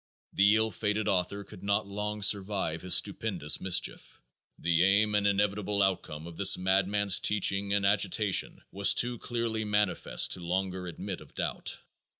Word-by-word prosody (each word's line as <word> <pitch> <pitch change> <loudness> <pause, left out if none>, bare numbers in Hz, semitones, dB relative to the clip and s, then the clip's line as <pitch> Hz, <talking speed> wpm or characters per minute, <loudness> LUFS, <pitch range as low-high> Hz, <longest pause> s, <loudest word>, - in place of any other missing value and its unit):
The 100 +2 +4
ill 110 0 0
fated 105 +2 -2
author 95 +2 -1
could 100 -1 -14
not 100 0 -1
long 105 +1 -5
survive 100 -5 +1
his 90 -1 +2
stupendous 75 +1 +1
mischief. 95 -2 -1 0.4
The 85 +1 +1
aim 100 +3 +2
and 105 -1 +1
inevitable 100 0 0
outcome 80 -5 -3
of 85 -1 -11
this 100 -1 +5
madman's 95 +1 +2
teaching 100 -1 +1
and 100 0 0
agitation 100 0 0
was 100 0 +3
too 120 -1 +1
clearly 115 -2 -3
manifest 105 -2 +1
to - - -2
longer 90 +1 -3
admit 85 - -7
of - - -17
doubt. - - -5
100 Hz, 150 wpm, -28 LUFS, 95-105 Hz, 0.4 s, this